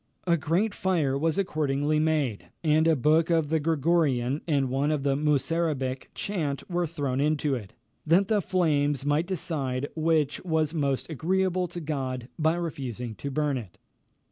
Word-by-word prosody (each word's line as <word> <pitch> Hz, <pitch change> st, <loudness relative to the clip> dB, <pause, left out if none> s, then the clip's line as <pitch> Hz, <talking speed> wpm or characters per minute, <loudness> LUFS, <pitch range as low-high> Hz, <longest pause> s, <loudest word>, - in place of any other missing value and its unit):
A 170 Hz, -2 st, +4 dB
great 175 Hz, +7 st, 0 dB
fire 165 Hz, -8 st, +1 dB
was 160 Hz, +4 st, 0 dB
accordingly 150 Hz, -5 st, 0 dB
made, 150 Hz, -8 st, 0 dB, 0.2 s
and 155 Hz, 0 st, +3 dB
a 165 Hz, -, +5 dB
book 155 Hz, +4 st, +3 dB
of 165 Hz, -3 st, +2 dB
the 160 Hz, 0 st, +2 dB
Gregorian 150 Hz, -4 st, +1 dB
and 140 Hz, -4 st, +2 dB
one 140 Hz, +3 st, +1 dB
of 150 Hz, -3 st, 0 dB
the 140 Hz, -1 st, +2 dB
Musarabic 145 Hz, -2 st, 0 dB
chant 155 Hz, -9 st, -3 dB
were 175 Hz, -1 st, 0 dB
thrown 145 Hz, -5 st, -2 dB
into 150 Hz, -1 st, +1 dB
it, 105 Hz, -7 st, -5 dB, 0.3 s
that 180 Hz, +5 st, +4 dB
the 210 Hz, -1 st, +2 dB
flames 145 Hz, -6 st, +1 dB
might 150 Hz, +4 st, +1 dB
decide 145 Hz, -7 st, -2 dB
which 155 Hz, -3 st, +1 dB
was 160 Hz, -3 st, 0 dB
most 140 Hz, -4 st, -1 dB
agreeable 180 Hz, +3 st, 0 dB
to 175 Hz, +1 st, -7 dB
God 130 Hz, -5 st, -3 dB
by 160 Hz, +1 st, +3 dB
refusing 130 Hz, -9 st, -4 dB
to 140 Hz, -, -6 dB
burn 145 Hz, -1 st, 0 dB
it. 100 Hz, -7 st, -11 dB
150 Hz, 160 wpm, -27 LUFS, 140-165 Hz, 0.3 s, a